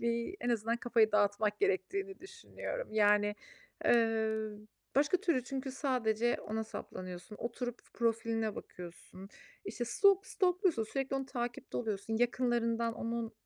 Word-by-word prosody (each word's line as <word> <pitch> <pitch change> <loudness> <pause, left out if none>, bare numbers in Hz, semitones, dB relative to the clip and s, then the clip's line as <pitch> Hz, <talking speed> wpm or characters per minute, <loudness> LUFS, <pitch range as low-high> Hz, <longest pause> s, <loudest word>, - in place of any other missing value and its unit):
bir 235 +9 -1
en 245 - -2
azından 230 0 +1
kafayı 230 -3 +3
dağıtmak 210 +1 +2
gerektiğini 390 - 0
düşünüyorum. 470 +4 -6
Yani, 210 -1 +4 0.5
eee, 220 -2 +3 0.5
başka 290 +6 +4
türlü 335 -9 +1
çünkü 265 0 -3
sadece 240 -4 +1
ona 220 +1 -3
saplanıyorsun, 185 -2 -7
oturup 240 +1 -4 0.2
profiline 225 -2 0
bakıyorsun, 180 +2 -10 0.4
işte, 230 +4 -3
stalk 390 - +4
stalk'luyorsun, 360 - +2
sürekli 270 +5 -2
onu 270 -1 -3
takipte 240 -2 -4
oluyorsun, 220 -1 -2
yakınlarından 235 -1 +1
onun, 230 0 -3
235 Hz, 120 wpm, -33 LUFS, 220-265 Hz, 0.5 s, Yani